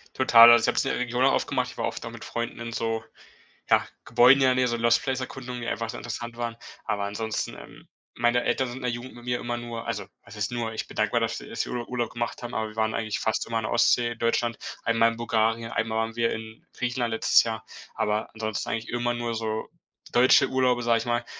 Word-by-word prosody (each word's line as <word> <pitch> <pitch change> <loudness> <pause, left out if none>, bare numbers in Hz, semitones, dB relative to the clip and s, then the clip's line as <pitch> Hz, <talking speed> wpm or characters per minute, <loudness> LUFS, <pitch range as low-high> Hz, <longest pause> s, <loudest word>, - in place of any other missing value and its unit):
Total, 120 -3 +8
also 120 - +6
ich - - +2
hab's - - +1
in 135 - 0
der - - -2
Region 125 0 0
oft 135 - +2
gemacht, - - -1
ich - - -16
war - - -1
oft - - -6
auch - - -6
mit - - -10
Freunden 120 0 -4
in 115 0 -5
so, 115 0 -2 0.7
ja, - - +4 0.2
Gebäuden 130 +3 +6
ja, 130 -1 +5
ne, 130 0 +2
so 120 -1 -1
Lost 115 0 +3
Place 135 -2 -1
Erkundungen, 125 -1 -6
die 120 - -5
einfach 115 -1 -2
so - - -5
interessant 120 0 -6
waren. 120 -1 -3 0.3
Aber 100 -1 -1
ansonsten, 110 +2 -3
ähm, - - -13 0.3
meine 120 +1 +2
Eltern 130 - 0
sind 120 +1 -7
in - - -9
der 125 - 0
Jugend 120 +2 -7
mit 120 0 -13
mir 125 0 -1
immer 120 0 -3
nur 120 -1 -6
also 115 - -3 0.2
was 115 -2 -13
heißt 105 +1 -2
nur, 120 -2 -2
ich 110 - -4
bin - - -12
dankbar, - - +1
dass, - - -2
äh, - - -11
dass - - -2
wir - - -7
Urlaub 120 -1 -4
Urlaub 120 -2 -1
gemacht 120 +1 -4
haben, 120 - -6
aber 110 0 -2
wir 105 - -14
waren 110 0 0
eigentlich 110 -2 -2
fast 110 - -1
immer 115 - -1
an 115 - -1
der - - -3
Ostsee 120 0 +3
in 120 - -8
Deutschland. 115 0 0 0.3
Einmal 115 0 +3
in 115 - -8
Bulgarien, 115 0 0
einmal 110 -1 -1
waren 115 0 -2
wir 115 0 +1
in 110 0 -7
Griechenland 120 -1 -2
letztes 110 - +4
Jahr, 110 -1 -4 0.3
aber 105 +1 -1
ansonsten 110 -2 -3
eigentlich 115 0 -3
immer 120 0 0
nur 120 -1 -3
so 110 -1 -3 0.4
deutsche 125 +2 +5
Urlaube, 125 -2 +2
sag 115 0 +3
ich - - -3
mal, 120 0 0
120 Hz, 250 wpm, -26 LUFS, 115-120 Hz, 0.7 s, Total